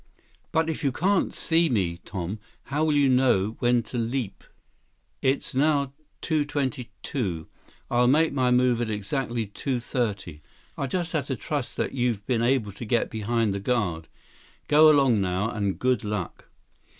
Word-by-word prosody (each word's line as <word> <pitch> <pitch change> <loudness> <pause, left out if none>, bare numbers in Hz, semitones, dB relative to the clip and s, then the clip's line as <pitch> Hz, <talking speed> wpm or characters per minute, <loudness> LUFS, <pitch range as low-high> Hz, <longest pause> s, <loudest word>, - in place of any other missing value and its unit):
"But 160 0 +2
if 160 0 -3
you 140 - +2
can't 190 +7 +1
see 165 0 +2
me, 90 -8 0
Tom, 95 +2 -4 0.2
how 145 +3 -1
will 155 -2 +2
you 145 -1 +4
know 125 -5 +3
when 120 -1 +2
to 120 - -5
leap?" 115 -3 -3 0.8
"It's 135 +1 0
now 140 0 +2 0.3
two 155 -3 +1
twenty 140 -4 -3
two. 90 - -3 0.4
I'll 120 0 +3
make 155 +4 +3
my 130 -2 +2
move 125 -1 +3
at 115 - -1
exactly 115 +3 -2
two 125 +5 -3
thirty. 100 - -3 0.3
I'll 140 - -2
just 175 +4 -2
have 150 -5 -1
to 135 - -1
trust 135 +3 -4
that - - -1
you've 120 -6 -1
been 120 -3 0
able 120 -4 +1
to 105 - -9
get 115 +1 0
behind 110 -1 0
the 100 - -3
guard. 95 -8 -1 0.6
Go 155 +1 +7
along 135 -8 +4
now, 95 +4 0
and 100 -3 -1
good 125 -3 +1
luck." 105 -4 -5
125 Hz, 165 wpm, -26 LUFS, 105-140 Hz, 0.8 s, Go